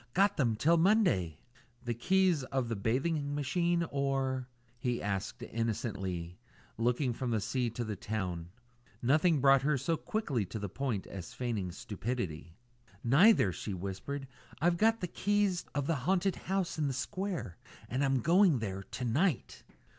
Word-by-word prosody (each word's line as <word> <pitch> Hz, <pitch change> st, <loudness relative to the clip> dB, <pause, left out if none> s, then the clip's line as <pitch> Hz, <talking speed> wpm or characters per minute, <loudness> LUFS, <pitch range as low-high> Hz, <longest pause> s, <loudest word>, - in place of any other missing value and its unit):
"Got 200 Hz, +2 st, +4 dB
them 120 Hz, -7 st, +2 dB
till 165 Hz, +9 st, +3 dB
Monday!" 165 Hz, -, +3 dB, 0.5 s
"The 120 Hz, -, 0 dB
keys 180 Hz, +4 st, +2 dB
of 130 Hz, -3 st, -2 dB
the 115 Hz, -, -1 dB
bathing 145 Hz, +8 st, 0 dB
machine, 170 Hz, +4 st, +1 dB
or 135 Hz, -2 st, 0 dB, 0.2 s
?" 120 Hz, 0 st, -35 dB
he 120 Hz, -1 st, -1 dB
asked 100 Hz, -1 st, -3 dB
innocently, 95 Hz, -7 st, -3 dB, 0.4 s
looking 120 Hz, +3 st, +1 dB
from 125 Hz, +1 st, -3 dB
the 115 Hz, -2 st, +1 dB
sea 115 Hz, +4 st, -1 dB
to 120 Hz, +2 st, -4 dB
the 110 Hz, -2 st, -3 dB
town. 95 Hz, -5 st, -4 dB, 0.5 s
Nothing 155 Hz, +5 st, +4 dB
brought 135 Hz, 0 st, +6 dB
her 145 Hz, +2 st, +2 dB
so 165 Hz, +5 st, 0 dB
quickly 150 Hz, -, -1 dB
to 100 Hz, +4 st, -6 dB
the 100 Hz, -2 st, -4 dB
point 125 Hz, -4 st, -2 dB
as 100 Hz, +6 st, -8 dB
feigning 115 Hz, -8 st, -2 dB
stupidity. 95 Hz, -5 st, -4 dB, 0.5 s
"Neither," 140 Hz, -, +6 dB
she 100 Hz, +3 st, -5 dB
whispered. 100 Hz, +10 st, -5 dB, 0.3 s
"I've 170 Hz, +1 st, +2 dB
got 225 Hz, +3 st, +3 dB
the 180 Hz, -, -1 dB
keys 205 Hz, -1 st, +1 dB
of 145 Hz, -1 st, 0 dB
the 160 Hz, 0 st, +1 dB
haunted 185 Hz, +7 st, +1 dB
house 190 Hz, -3 st, -2 dB
in 150 Hz, -, +1 dB
the 135 Hz, -, -1 dB
square 170 Hz, -, -3 dB, 0.3 s
and 130 Hz, +3 st, -1 dB
I'm 135 Hz, -2 st, +2 dB
going 175 Hz, -, +5 dB
there 95 Hz, -4 st, -3 dB
to 115 Hz, +5 st, -6 dB
night." 145 Hz, +5 st, 0 dB
130 Hz, 160 wpm, -32 LUFS, 110-165 Hz, 0.5 s, brought